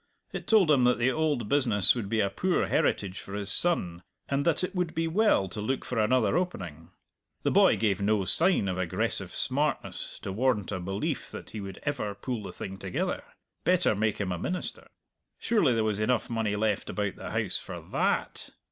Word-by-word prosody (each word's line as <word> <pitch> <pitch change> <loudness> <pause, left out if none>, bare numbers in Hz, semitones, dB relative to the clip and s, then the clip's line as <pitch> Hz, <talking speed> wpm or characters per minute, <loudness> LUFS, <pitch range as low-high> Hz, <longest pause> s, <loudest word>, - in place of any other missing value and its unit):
It - - -6
told 205 -8 +5
him 135 -4 +4
that 125 0 +4
the 120 +2 +2
old 150 -7 0
business 115 -9 +3
would 115 -5 -4
be 110 0 +1
a 100 - 0
poor 185 - +1
heritage 95 -1 0
for 100 - -8
his 100 -1 -3
son, 90 - +1 0.3
and 140 0 0
that 170 +1 +2
it 185 - -2
would 180 -3 -2
be 165 0 0
well 190 - +3
to 105 - -5
look 130 +6 -2
for 125 - -2
another 115 +2 +2
opening. 90 - -3 0.5
The - - +1
boy - - +5
gave 105 -3 +1
no 100 -1 +2
sign 175 - +4
of 95 -1 -2
aggressive 90 -3 -1
smartness - - -1
to 95 - -3
warrant 105 -2 0
a 95 - -2
belief 95 +3 -3
that - - -9
he 110 - -6
would 95 -1 -8
ever 125 -8 -2
pull 120 +1 -4
the 100 - -7
thing 95 0 -7
together. 95 -2 -3 0.4
Better 180 -6 +3
make 105 +1 0
him 100 -3 -2
a 90 - -3
minister. 180 - -4 0.5
Surely 170 - +2
there 110 - +1
was 105 -2 0
enough 120 +2 0
money 110 -3 0
left 105 -1 -1
about 105 -2 -2
the - - -7
house - - 0
for - - -7
tha - - -8
at! - - 0
110 Hz, 200 wpm, -28 LUFS, 100-145 Hz, 0.5 s, told